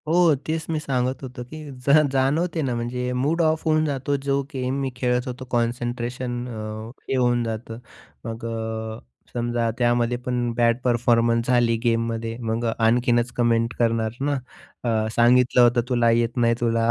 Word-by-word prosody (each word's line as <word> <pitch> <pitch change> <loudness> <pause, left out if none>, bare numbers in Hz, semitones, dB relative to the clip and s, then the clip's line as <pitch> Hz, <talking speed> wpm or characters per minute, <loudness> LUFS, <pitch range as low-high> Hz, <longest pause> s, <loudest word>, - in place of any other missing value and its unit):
हो 170 0 +4
तेच 160 0 -2
मी 160 -1 0
सांगत 130 -3 -1
होतो 125 -1 -7
की 155 - -8 0.3
जा 150 +2 +7
जाणवते 150 +6 +1
ना. 130 -4 -1
म्हणजे 125 +1 -3
मूड 145 +7 +1
ऑफ 160 -1 +1
होऊन 155 -1 +3
जातो. 140 -1 -1
जो 140 0 0
गेम 130 +1 -2
मी 135 - -1
खेळत 125 0 0
होतो 130 +1 -6
कॉन्सन्ट्रेशन 120 +1 -2
अ, 120 - -7 0.5
हे - - +1
होऊन 120 -1 +2
जातं 115 0 -5 0.5
मग 115 0 -5
अ, 110 -1 -4 0.3
समजा 120 -1 0
त्यामध्ये 120 0 +2
पण 125 -1 -1
बॅड 115 -1 +3
परफॉर्मन्स 115 -1 +2
झाली 120 -2 +3
गेममध्ये 115 -1 -1
मग 115 0 -2
आणखीनच 120 +1 +2
कमेंट 115 -1 +2
करणार 115 -1 0
ना. 145 0 +1 0.5
अ, 110 -2 +1
सांगितलं 125 +1 +5
होतं 120 0 +5
तुला 120 -2 +3
येत 115 +1 +1
नाही 115 -1 +3
तुला. 115 -1 +1
120 Hz, 160 wpm, -23 LUFS, 115-130 Hz, 0.5 s, जा